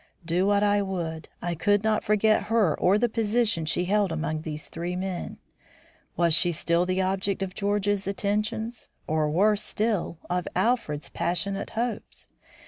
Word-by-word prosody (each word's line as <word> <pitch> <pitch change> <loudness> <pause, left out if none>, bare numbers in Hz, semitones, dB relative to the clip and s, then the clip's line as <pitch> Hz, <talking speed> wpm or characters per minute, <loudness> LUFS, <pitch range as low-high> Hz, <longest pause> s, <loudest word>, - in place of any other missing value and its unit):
Do 175 +3 +1
what 205 0 +3
I 205 0 +3
would, 170 -5 -4
I 175 0 -1
could 205 +5 +2
not 220 -1 +1
forget 215 +1 +2
her 215 -8 +2
or 190 +3 +4
the 240 +3 +2
position 220 -6 0
she 175 +2 0
held 200 0 +1
among 155 -1 -2
these 155 -1 -5
three 175 +2 -4
men. 185 -1 -4 0.8
Was 170 -1 +3
she 175 +2 +6
still 170 +2 +1
the 185 +1 +1
object 195 +1 -1
of 185 -1 -5
George's 205 0 0
attentions 210 +3 -2 0.2
or 155 -1 0
worse 205 +6 +3
still 210 -5 -1
of 180 0 -2
Alfred's 225 -12 0
passionate 195 +3 -1
hopes? 235 0 -4
195 Hz, 155 wpm, -26 LUFS, 170-210 Hz, 0.8 s, she